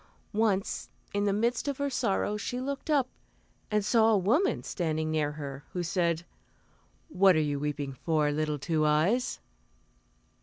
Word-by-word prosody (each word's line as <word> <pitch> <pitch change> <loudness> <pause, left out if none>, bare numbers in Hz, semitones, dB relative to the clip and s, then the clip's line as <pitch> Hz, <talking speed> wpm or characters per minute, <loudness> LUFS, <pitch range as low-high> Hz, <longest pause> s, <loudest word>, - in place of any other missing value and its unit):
Once, 205 -2 0 0.2
in 205 0 +1
the 200 - +2
midst 230 +6 0
of 280 -2 -1
her 285 - 0
sorrow 210 -4 0
she 245 +4 -3
looked 280 +4 -4
up, 280 -4 +3 0.6
and 210 -1 +1
saw 225 +1 +4
a 220 - +4
woman 245 - +2
standing 155 -3 -2
near 150 -2 0
her 140 -2 -7
who 180 - -2
said, 170 -1 0 0.8
"What 185 +1 +4
are - - +3
you 145 -2 0
weeping 145 -1 -3
for, 150 +2 +1
little 150 0 -1
Two 155 +2 0
Eyes?" 160 +12 +2
180 Hz, 155 wpm, -29 LUFS, 155-225 Hz, 0.8 s, saw